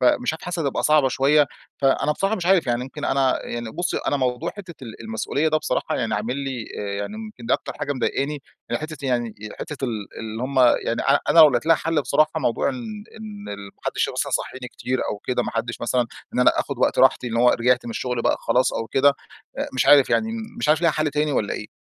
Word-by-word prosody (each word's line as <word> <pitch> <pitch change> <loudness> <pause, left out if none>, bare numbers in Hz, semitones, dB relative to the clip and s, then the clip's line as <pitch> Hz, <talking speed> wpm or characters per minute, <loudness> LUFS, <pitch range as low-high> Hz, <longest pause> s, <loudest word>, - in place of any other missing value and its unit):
فمش 125 +2 +3
عارف 160 - -8
حاسس 175 0 -4
هتبقى 140 -5 -1
صعبة 150 -3 +4
شويّة. 140 +3 +3 0.3
فأنا 140 +2 +2
بصراحة 195 +7 0
مش 175 - -4
عارف 190 -2 +4
يعني 120 -1 0
يمكن 140 +3 -7
أنا 135 -1 +2
يعني 120 -1 -5
بُصّي، 175 +8 -2
أنا 145 - +2
موضوع 130 +4 -1
حتّة 190 -5 -9
ال 115 -1 -9
المسؤوليّة 115 +7 -1
ده 155 - +2
بصراحة 155 0 -1
يعني 115 -3 -1
عامل 115 +6 -2
لي 135 -4 -4
آآ، 100 -1 -3
يعني 100 - -4
يمكن 215 - -9
دي 120 - +1
أكتر - - -1
حاجة 145 - -1
مضايقاني؛ 140 +3 -1 0.3
يعني 120 - -1
حتّة 155 0 -5
يعني 120 -3 -1 0.3
حتّة 145 -3 -5
ال 110 -5 -3
اللي 110 +1 -5
همّ 130 +1 -1 0.3
يعني 115 - -1 0.3
أنا - - +4
لو 155 -2 +10
لقيت 120 +2 -1
لها 165 0 +6
حل 165 -2 0
بصراحة 155 +4 +2
موضوع 125 - +1
إن 225 -6 -5 0.2
إن 210 -2 -8
ال 100 0 -7
ما 100 - -15
حدش - - 0
مثلًا - - -2
يصحيني 130 -1 -3
كتير 130 +2 -3
أو 105 - -3
كده، 125 - +1
ما - - -4
حدش 115 0 -3
مثلًا 120 0 +1 0.3
إن - - +1
أنا 125 - +4
آخد - - -5
وقت - - +1
راحتي، - - +4
إن 115 - -3
هوّ 125 +1 +5
رجعت 125 +1 +2
مِن - - -4
الشغل 125 +1 -2
بقى - - +2
خلاص 125 - +2
أو 115 - -3
كده، 140 +3 +4 0.4
آآ، - - -2
مش 130 - +1
عارف 140 -2 +7
يعني 220 - +2 0.3
مش - - -1
عارف 155 +2 +3
ليها 170 - +5
حل 155 0 0
تاني 150 +1 0
والّا 110 -6 0
إيه؟ 105 - -6
135 Hz, 235 wpm, -23 LUFS, 120-155 Hz, 0.4 s, لو